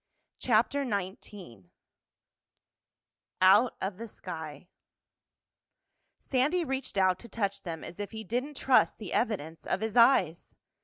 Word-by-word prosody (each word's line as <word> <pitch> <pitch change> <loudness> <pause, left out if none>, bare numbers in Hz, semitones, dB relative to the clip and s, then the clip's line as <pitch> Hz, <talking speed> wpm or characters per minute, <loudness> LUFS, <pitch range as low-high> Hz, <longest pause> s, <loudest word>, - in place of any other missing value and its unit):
CHAPTER 245 +4 +2
XIX 190 - -6 1.7
OUT 200 +6 +5
OF 190 -1 -4
THE 230 +2 -7
SKY 160 -6 -8 1.5
Sandy 295 +7 0
reached 265 -5 -4
out 185 -1 +3
to 235 - -11
touch 200 -2 -2
them 165 -3 -6
as 175 - -10
if 205 - -4
he 220 -1 -7
didn't 255 +7 -3
trust 260 -1 +3
the 210 -5 -7
evidence 165 -9 -2
of 195 - -1
his 220 -1 -3
eyes. 230 - +3
205 Hz, 120 wpm, -29 LUFS, 185-245 Hz, 1.7 s, OUT